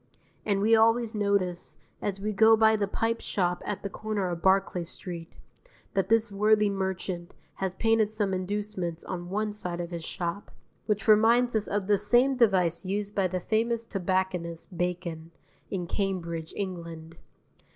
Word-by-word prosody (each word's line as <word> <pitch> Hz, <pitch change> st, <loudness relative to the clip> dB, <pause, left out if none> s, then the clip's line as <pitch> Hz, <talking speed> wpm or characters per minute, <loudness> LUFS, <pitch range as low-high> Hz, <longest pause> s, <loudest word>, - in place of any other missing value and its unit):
And 200 Hz, -2 st, +2 dB
we 225 Hz, +2 st, +5 dB
always 225 Hz, +1 st, +3 dB
notice, 200 Hz, -4 st, 0 dB, 0.2 s
as 195 Hz, -1 st, -2 dB
we 210 Hz, +2 st, -2 dB
go 220 Hz, +2 st, +6 dB
by 220 Hz, 0 st, +5 dB
the 205 Hz, -2 st, 0 dB
pipe 225 Hz, +3 st, -1 dB
shop 180 Hz, -2 st, -1 dB
at 205 Hz, -, -3 dB
the 200 Hz, -, -3 dB
corner 210 Hz, -3 st, -2 dB
of 170 Hz, -1 st, -4 dB
Barclay 190 Hz, -1 st, +2 dB
Street, 170 Hz, 0 st, -7 dB, 0.6 s
that 195 Hz, -1 st, 0 dB
this 225 Hz, -1 st, +3 dB
worthy 210 Hz, +1 st, +3 dB
merchant 190 Hz, -2 st, -3 dB, 0.2 s
has 190 Hz, -1 st, -2 dB
painted 225 Hz, -1 st, +2 dB
some 205 Hz, -3 st, -1 dB
inducements 185 Hz, -3 st, -3 dB
on 175 Hz, -1 st, -5 dB
one 210 Hz, +2 st, -1 dB
side 180 Hz, -4 st, -4 dB
of 175 Hz, 0 st, -4 dB
his 170 Hz, -1 st, -5 dB
shop; 175 Hz, +3 st, -4 dB, 0.4 s
which 210 Hz, 0 st, 0 dB
reminds 230 Hz, +3 st, +5 dB
us 215 Hz, -1 st, +1 dB
of 205 Hz, -1 st, -1 dB
the 205 Hz, 0 st, +3 dB
same 245 Hz, +6 st, +3 dB
device 185 Hz, -8 st, +3 dB
used 200 Hz, +2 st, -3 dB
by 195 Hz, -2 st, +2 dB
the 185 Hz, 0 st, -2 dB
famous 230 Hz, +4 st, 0 dB
tobacconist 185 Hz, -3 st, -2 dB
Bacon, 170 Hz, -2 st, -3 dB, 0.4 s
in 180 Hz, -3 st, -3 dB
Cambridge, 170 Hz, -4 st, -3 dB
England. 170 Hz, -4 st, -6 dB
195 Hz, 160 wpm, -28 LUFS, 180-215 Hz, 0.6 s, go